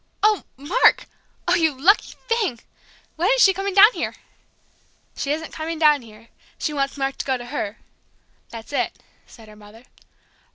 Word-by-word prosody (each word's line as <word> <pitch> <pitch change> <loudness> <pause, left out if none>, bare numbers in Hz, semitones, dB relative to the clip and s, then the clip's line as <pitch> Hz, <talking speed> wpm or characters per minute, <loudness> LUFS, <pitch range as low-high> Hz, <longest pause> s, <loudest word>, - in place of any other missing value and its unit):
Oh, 425 -1 +3
Mark! 320 - +3 0.4
Oh, 350 - +3
you 320 -6 +1
lucky 385 +9 +3
thing! 445 - 0 0.6
When 350 +5 +1
is - - +4
she 385 - +6
coming 390 +1 -4
down 415 +4 +8
here?" - - -4 1.0
"She 280 - -3
isn't 320 +2 -4
coming 320 +1 -4
down 300 -3 +4
here 225 0 -16 0.3
she 300 - -3
wants 275 0 -2
Mark 270 0 -2
to - - -3
go 265 -2 0
to 240 - -9
her 235 -5 -5 0.7
that's 230 +4 -10
it," - - -1 0.3
said 225 -2 -16
her 215 - -14
mother. 210 +2 -16
295 Hz, 165 wpm, -22 LUFS, 240-375 Hz, 1.0 s, down